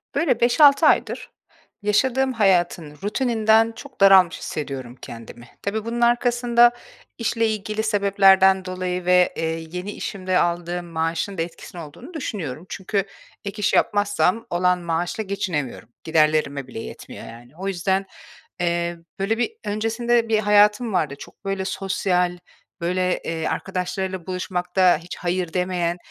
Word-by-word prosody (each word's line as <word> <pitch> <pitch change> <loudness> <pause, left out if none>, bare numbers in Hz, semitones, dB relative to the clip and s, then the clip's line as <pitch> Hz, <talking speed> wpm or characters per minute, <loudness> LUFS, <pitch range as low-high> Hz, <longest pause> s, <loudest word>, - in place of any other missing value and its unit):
Böyle, 285 -8 +2
5-6 280 +5 +6
aydır, - - +1 0.5
yaşadığım 260 +6 +1
hayatın 175 -7 +1
rutininden 225 0 +2
çok 275 -2 -12
daralmış 190 -3 +6
hissediyorum 130 -5 -5
kendimi. 120 +1 -10
Tabii 215 +2 -3
bunun 235 +1 -3
arkasında 240 0 +4 0.5
işle 230 -1 0
ilgili 215 0 -2
sebeplerden 195 -2 +4
dolayı 185 -1 -3
ve, 180 0 +4
eee, 165 - -1 0.3
yeni 180 +3 -5
işimde 185 -3 -2
aldığım 175 0 -1
maaşında 165 +2 -2
etkisinin 170 +1 -7
olduğunu 165 - -11
düşünüyorum. 180 - -5
Çünkü 195 0 -2 0.4
ek 200 +2 -5
iş 205 - +1
yapmazsam 205 +1 +2
olan 180 +1 +2
maaşla 175 +5 -2
geçinemiyorum. 175 - -3
Giderlerime 155 -4 +1
bile 125 - -7
yetmiyor - - -9
yani. 120 +2 -12
O 190 +2 -5
yüzden, 190 +1 0 0.5
eee, 170 0 -1 0.2
böyle, 205 +4 0
bir 245 - 0
öncesinde, 225 +2 0
bir 220 -1 +3
hayatım 210 +2 +4
vardı. 155 -6 0
Çok - - -14
böyle 195 -1 -2
sosyal, 185 -2 0 0.4
böyle, 180 +1 0
eee, 165 -1 -2
arkadaşlarıyla 190 -1 -3
buluşmakta 180 -1 +1
hiç 170 +2 -9
"hayır" 175 -1 -2
demeyen. 180 -1 -1
190 Hz, 130 wpm, -22 LUFS, 175-215 Hz, 0.5 s, 5-6